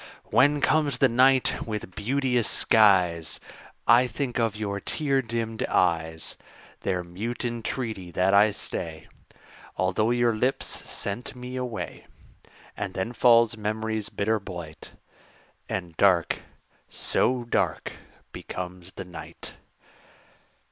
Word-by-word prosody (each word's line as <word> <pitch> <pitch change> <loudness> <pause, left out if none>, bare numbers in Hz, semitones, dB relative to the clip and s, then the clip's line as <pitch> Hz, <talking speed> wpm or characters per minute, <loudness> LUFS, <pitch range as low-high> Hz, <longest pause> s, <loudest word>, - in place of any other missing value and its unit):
When 145 +2 +4
comes 150 -2 +2
the 135 - +5
night 130 +2 +3
with 105 -4 -5
beauteous 125 +1 +1
skies, 90 -7 +3 0.5
I 120 +2 +6
think 125 +1 -3
of 115 -3 +1
your 100 -2 -3
tear 140 +3 0
dimmed 115 -2 -3
eyes, 80 -2 0 0.4
Their 90 -2 -1
mute 105 +9 -5
entreaty 115 -5 -3
that 90 +3 +1
I 105 +2 +6
stay, 80 -5 -5 0.7
Although 95 +5 +1
your 120 -1 +2
lips 125 +5 0 0.2
sent 100 +6 -5
me 125 +1 -7
away; 125 -3 -5 0.7
And 100 -2 -5
then 95 +6 -2
falls 115 -2 +5
memory's 110 0 -2
bitter 110 +2 0
blight, 85 -5 -9 0.8
And 90 -3 -4
dark 90 -4 +3 0.5
so 125 -1 0
dark 120 - -1 0.4
becomes 90 0 -7
the - - -7
night. 90 -2 -10
110 Hz, 115 wpm, -26 LUFS, 95-120 Hz, 0.8 s, I